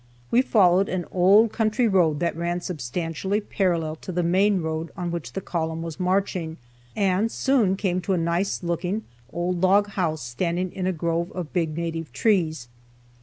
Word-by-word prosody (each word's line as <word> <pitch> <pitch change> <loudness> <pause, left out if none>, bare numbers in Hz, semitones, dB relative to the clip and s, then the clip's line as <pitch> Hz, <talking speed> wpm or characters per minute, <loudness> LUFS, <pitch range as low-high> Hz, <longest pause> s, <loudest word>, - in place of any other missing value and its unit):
We 245 - +5
followed 195 -6 +4
an 180 -1 -2
old 200 +5 +5
country 225 +2 +1
road 170 -7 +3
that 170 -2 0
ran 170 +1 -1
substantially 170 - -3
parallel 170 -6 -1
to 185 - -7
the 175 0 0
main 190 +3 +3
road 160 +1 -3
on 175 -2 -3
which 150 -8 -5
the 195 - -3
column 165 -2 -3
was 165 0 -7
marching, 180 -3 -1 0.4
and 200 +2 +1
soon 240 -9 +2
came 185 -2 -1
to 190 - -1
a - - +1
nice 170 +4 -1
looking 175 +5 -2 0.3
old 175 0 -2
log 200 +2 +4
house 165 -7 -2
standing 170 +9 -2
in 185 -1 -2
a - - +2
grove 170 +1 -2
of 175 -4 -6
big 165 -4 -1
native 165 -3 -3
trees. 160 - +1
175 Hz, 170 wpm, -24 LUFS, 165-195 Hz, 0.4 s, We